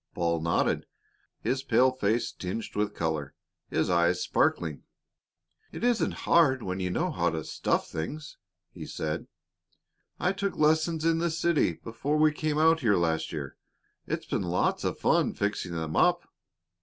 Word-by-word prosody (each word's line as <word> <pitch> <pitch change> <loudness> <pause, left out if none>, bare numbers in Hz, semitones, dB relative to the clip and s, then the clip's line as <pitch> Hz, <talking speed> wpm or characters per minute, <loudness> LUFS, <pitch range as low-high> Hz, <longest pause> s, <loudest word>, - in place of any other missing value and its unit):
Paul 85 -2 0
nodded, 85 +1 0 0.5
his 130 +1 0
pale 130 0 +3
face 115 -2 0
tinged 95 +5 -5
with 105 0 -1
color, 80 -4 -2 0.3
his - - 0
eyes 85 0 +2
sparkling. 80 -4 0 0.9
"It - - -7
isn't 240 -2 0
hard 135 -7 +4
when 95 0 -3
you 90 -1 -1
know 170 - 0
how 85 - +1
to 80 -1 -3
stuff - - -1
things," 145 - -5 0.3
he - - -9
said. 75 -1 -4 0.9
"I 180 - +2
took 200 0 -3
lessons 160 +1 +2
in 165 0 +3
the 170 +1 +1
city 165 - +1
before 125 - -3
we 155 0 +5
came 150 0 -2
out 160 +1 +4
here 110 -8 +3
last 80 -2 0
year. 75 -5 -6 0.5
It's - - -3
been - - -1
lots 90 -1 0
of - - -1
fun - - +2
fixing 100 -4 -2
them 80 -1 -3
up." - - +3
110 Hz, 155 wpm, -28 LUFS, -, 0.9 s, we